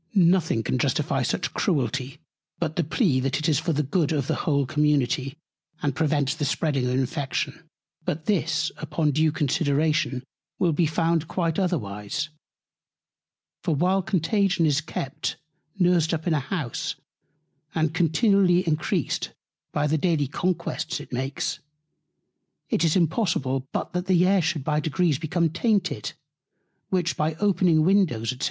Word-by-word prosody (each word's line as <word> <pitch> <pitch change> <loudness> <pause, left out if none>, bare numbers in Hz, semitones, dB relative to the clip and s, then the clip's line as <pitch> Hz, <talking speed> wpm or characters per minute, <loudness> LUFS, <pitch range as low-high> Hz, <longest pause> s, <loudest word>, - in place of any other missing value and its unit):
Nothing 170 - +3
can 65 -8 -1
justify - - +1
such - - -1
Cruelty, 130 -2 -1 0.4
but 160 -2 -2
the 175 - +1
Plea, 155 - +1
that 135 +1 0
it 155 +2 -1
is 150 -3 +3
for 165 +1 -1
the 150 0 +1
Good 150 +3 0
of 145 -4 0
the - - 0 0.2
whole 140 -2 +2
Community, 145 0 +1 0.5
and 145 -2 0
prevents 150 -4 +1
the 155 - -4
spreading 140 -2 0
of 125 - 0
Infection. 135 +1 -2 0.3
But 155 +1 -3
this 155 -5 +1
upon 155 0 0
due 155 +2 +2
Consideration 145 -2 +1 0.3
will 175 - +2
be 165 +2 +2
found 165 0 +1
quite 165 -1 -1
otherwise: 140 - -2 1.3
For 160 - 0
while 185 +6 +2
Contagion 190 -2 +1
is 150 0 +2
kept 135 -4 -4 0.4
nursed 175 -3 +3
up 155 - -6
in 170 - +2
a 155 - +2
House, 140 - -3 0.8
and 160 -1 +1
continually 180 +1 +3
encreased 155 -1 0 0.4
by 145 - 0
the 155 +1 +1
daily 160 -3 +1
Conquests 170 +2 -2
it - - -11
makes, 135 +2 -2 1.1
it - - +2
is 160 -2 +3
impossible 160 - +1
but - - -3
the 180 -1 +4
Air 195 0 +4
should 155 -3 -1
by 150 +2 +1
Degrees 155 -1 +1
become 165 +1 0
tainted, 195 +3 0 0.8
which 175 -3 0
by 155 +1 0
opening 180 -5 +3
Windows, 165 - +2
&c. 125 - -9
155 Hz, 145 wpm, -25 LUFS, 140-175 Hz, 1.3 s, the